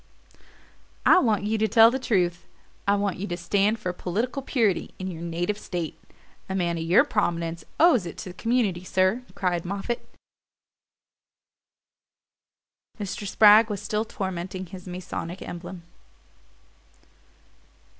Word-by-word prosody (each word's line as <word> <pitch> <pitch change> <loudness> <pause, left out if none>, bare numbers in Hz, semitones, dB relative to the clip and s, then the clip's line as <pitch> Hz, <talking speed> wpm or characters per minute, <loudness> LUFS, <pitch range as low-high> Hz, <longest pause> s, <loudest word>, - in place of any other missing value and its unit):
"I - - +7
want 215 - +1
you 215 +1 0
to 220 - +2
tell 225 +1 +7
the 265 - -2
truth 180 -8 0 0.4
I 200 - +4
want 200 -2 -1
you 200 - -4
to 175 - -3
stand 200 +5 +1
for 185 -5 -3
political 225 +11 -2
purity 225 -9 0
in 185 0 -4
your 165 -1 -8
native 175 +5 -2
state. 175 -6 -4 0.5
A 190 - -2
man 170 -3 0
of - - -3
your 180 +10 +5
prominence 170 - -1 0.2
owes 305 - +5
it 170 - -8
to - - -7
the - - -8
community, 220 -6 0
sir," 185 +5 +1
cried 175 -3 -1
Moffatt. 200 +6 -3 3.0
Mr. 205 0 -4
Spragg 215 +2 +7
was 205 -2 -3
still 215 +3 -1
tormenting 190 -2 -5
his 185 +1 -11
Masonic 180 0 -6
emblem. 175 0 -8
190 Hz, 135 wpm, -25 LUFS, 175-215 Hz, 3.0 s, I